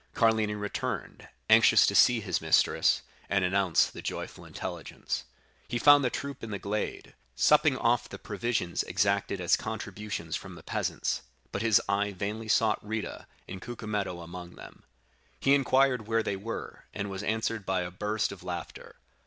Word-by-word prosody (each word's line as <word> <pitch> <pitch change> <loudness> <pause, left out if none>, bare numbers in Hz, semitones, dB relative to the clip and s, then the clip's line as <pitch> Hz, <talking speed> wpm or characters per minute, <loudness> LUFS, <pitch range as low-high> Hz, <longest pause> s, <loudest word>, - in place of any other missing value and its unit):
Carlini 110 -2 +2
returned, 105 0 -4 0.2
anxious - - +7
to - - +1
see 120 -2 +5
his 90 -4 -1
mistress, 80 -1 +3 0.3
and 100 -2 +2
announce 95 -2 +3
the - - -8
joyful - - -6
intelligence. - - -5 0.4
He 120 - -2
found 145 +3 +7
the 125 - +2
troop 140 0 -5
in 115 - -5
the 100 - -3
glade, 105 +2 -4 0.2
supping - - +4
off - - +1
the - - -7
provisions 115 -7 -2
exacted 100 +1 0
as 90 0 +3
contributions 105 -6 -5
from - - -7
the - - -12
peasants; - - -2 0.3
but 100 - -3
his 110 -2 +5
eye 100 +1 0
vainly 105 +4 -4
sought 110 0 +2
Rita 110 0 -5 0.2
and 95 0 -7
Cucumetto 105 -6 -4
among 85 +1 -9
them. - - -13 0.5
"He 135 - +4
inquired 130 -4 +3
where 115 0 +1
they 100 - -1
were, 105 +4 -6
and 100 - -3
was 95 - -4
answered 110 -1 -1
by 95 -1 0
a 90 0 -4
burst 105 +4 -1
of 100 - -9
laughter. 90 -1 -7
105 Hz, 160 wpm, -29 LUFS, 95-115 Hz, 0.5 s, anxious